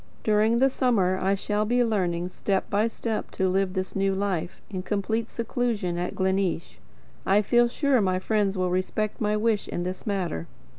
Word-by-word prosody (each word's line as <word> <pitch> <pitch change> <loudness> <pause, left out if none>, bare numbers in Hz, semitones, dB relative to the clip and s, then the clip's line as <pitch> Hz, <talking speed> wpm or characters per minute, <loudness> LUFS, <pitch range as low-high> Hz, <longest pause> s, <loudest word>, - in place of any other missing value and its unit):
During 215 +2 +3
the 265 +3 +5
summer 195 -9 +2
I 195 +1 +2
shall 210 +1 -1
be 245 +3 +2
learning 180 -6 0
step 190 +1 -1
by 210 +2 +3
step 225 -1 -3
to 190 - +1
live 190 0 +1
this 185 -1 -3
new 195 0 +1
life, 185 -4 -2
in 185 -3 -4
complete 215 +4 -1
seclusion 225 -7 -2
at 180 - -3
Gleneesh. 190 -2 -1 0.4
I 205 +2 +3
feel 240 +3 +4
sure 270 0 +2
my 185 -2 +1
friends 200 0 0
will 185 -1 0
respect 205 +4 -1
my 210 0 +1
wish 215 -1 +1
in 175 - -3
this 185 +4 -5
matter. 180 - -2
200 Hz, 180 wpm, -26 LUFS, 185-220 Hz, 0.4 s, the